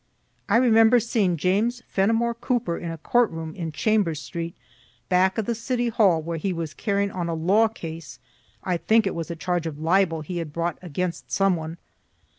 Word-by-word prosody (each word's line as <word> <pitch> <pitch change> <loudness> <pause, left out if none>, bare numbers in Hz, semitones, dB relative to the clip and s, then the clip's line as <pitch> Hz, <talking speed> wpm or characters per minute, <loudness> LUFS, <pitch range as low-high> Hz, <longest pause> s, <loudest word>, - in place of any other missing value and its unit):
I - - +5
remember 230 -1 +5
seeing 205 -6 0
James 215 +9 0
Fenimore 225 +4 +1
Cooper 235 -7 -1
in 170 - -5
a 165 - -5
court 240 +8 +2
room 160 -1 -6
in 165 -3 -5
Chambers 195 -4 +1
street, 165 +3 -6 0.5
back 190 +2 +3
of 220 - 0
the 235 - 0
city 240 +1 -1
hall, 195 -8 +3
where 165 +1 -3
he 190 +5 -1
was 165 -3 -4
carrying 200 -1 -1
on 175 -2 -3
a 165 - -1
law 195 +8 +3
case 165 -7 -8 0.5
(I 180 -2 0
think 220 +5 +3
it 195 - -1
was 165 0 -5
a 170 - -4
charge 175 0 -2
of 150 -3 -6
libel 165 +1 +2
he 175 +4 -5
had 160 -3 -5
brought 170 +1 -2
against 180 0 -4
some 195 -2 +3
one.) 160 0 -6
180 Hz, 195 wpm, -24 LUFS, 165-220 Hz, 0.5 s, I